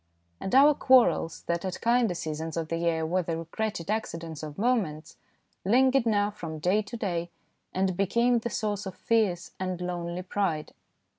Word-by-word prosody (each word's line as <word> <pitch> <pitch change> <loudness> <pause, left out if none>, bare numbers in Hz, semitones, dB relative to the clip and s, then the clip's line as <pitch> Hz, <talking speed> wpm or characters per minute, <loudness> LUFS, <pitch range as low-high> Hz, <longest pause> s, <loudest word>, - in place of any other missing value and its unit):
And 190 - -2
our 285 +3 +8
quarrels, 255 - +3
that 170 0 -2
at 185 -1 -4
kinder 235 -5 +2
seasons 160 0 -4
of 160 -1 -2
the 165 - -1
year 165 -1 0
were 180 +3 +1
the 165 -1 -3
regretted 170 +2 -3
acci 220 -5 -1
dents 165 -2 -7
of 150 -2 -7
moments, 190 -10 0 0.5
lingered 255 +4 +4
now 205 -1 +2
from 165 -6 -7
day 180 +7 +2
to 225 +3 -7
day, 175 -5 -2 0.4
and 190 -1 0
became 235 +6 +2
the 235 - -3
source 205 -3 -2
of 185 - -7
fierce 205 -6 0
and 185 -1 -3
lonely 175 0 -4
pride. 180 -5 -2
185 Hz, 170 wpm, -28 LUFS, 165-220 Hz, 0.5 s, our